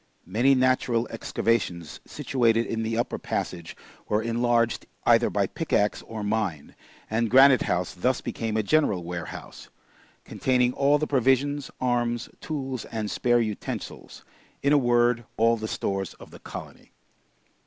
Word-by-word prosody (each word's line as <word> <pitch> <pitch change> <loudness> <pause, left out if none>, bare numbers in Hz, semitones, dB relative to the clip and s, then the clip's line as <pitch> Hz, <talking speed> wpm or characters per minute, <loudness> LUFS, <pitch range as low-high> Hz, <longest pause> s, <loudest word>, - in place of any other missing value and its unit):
Many 120 +9 +3
natural 130 -2 +2
excavations 100 -8 -2
situated 115 -3 +1
in 115 - -3
the 115 0 -2
upper 120 - -1
passage 85 -2 -4 0.3
were 105 +1 +1
enlarged 115 0 +1 0.2
either - - +5
by - - +1
pick - - -6
axe 105 0 +2
or 110 -2 -5
mine, 105 -8 -2 0.3
and 110 +1 0
Granite 135 +1 +7
House 90 0 -1
thus 125 +8 0
became 110 -1 -3
a 110 - +1
general 105 - +2
warehouse, 85 0 -7 0.6
containing 125 -1 +1
all 140 +2 +3
the 155 - -1
provisions, 140 +1 +1
arms, 120 -2 0
tools, 135 -5 -4
and 110 -2 -4
spare 120 -1 +2
utensils 110 -3 -6 0.4
in 140 +1 +4
a - - +6
word, 120 -1 +2
all 115 +1 +4
the 110 -1 -5
stores 95 -3 -3
of - - -14
the - - -12
colony. - - -10
115 Hz, 145 wpm, -26 LUFS, 110-130 Hz, 0.6 s, Granite